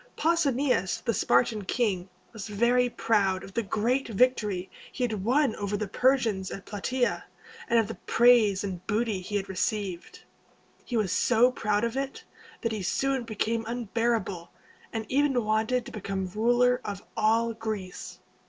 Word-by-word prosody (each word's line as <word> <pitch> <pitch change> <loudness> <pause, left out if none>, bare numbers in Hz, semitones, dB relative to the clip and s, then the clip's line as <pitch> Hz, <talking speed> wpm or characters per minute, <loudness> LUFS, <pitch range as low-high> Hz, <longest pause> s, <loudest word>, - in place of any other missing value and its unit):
Pausanias, 275 - +1
the 230 - +1
Spartan 200 - +2
king, 195 -6 -1 0.2
was 220 -2 -7
very 240 +4 +2
proud 195 -5 +1
of 195 - -11
the 230 - 0
great 230 +6 0
victory 210 -5 +1 0.2
he 255 - -3
had 215 -5 -2
won 260 +2 +2
over 205 0 -2
the 210 0 -3
Persians 225 -4 +1
at 195 - -8
Platæa, 245 +5 -1 0.5
and 235 - +3
of 225 -2 +3
the 225 - -5
praise 230 -6 +4
and 185 -3 -5
booty 215 -2 0
he 205 +3 -5
had 200 -1 -1
received. 190 -2 -3 0.6
He 240 - -2
was 205 -5 0
so 245 +1 +4
proud 210 -3 0
of 230 +1 -1
it, 275 0 -4 0.4
that 230 - -1
he 215 -2 -3
soon 265 +7 0
became 225 +1 -1
unbearable, 230 -6 -1 0.4
and 225 -1 -3
even 270 -4 +1
wanted 220 +3 +1
to - - -9
become 195 -2 -3
ruler 245 +6 +2
of 200 -1 -6
all 230 +2 +2
Greece. 215 -5 -6
220 Hz, 155 wpm, -27 LUFS, 200-245 Hz, 0.6 s, praise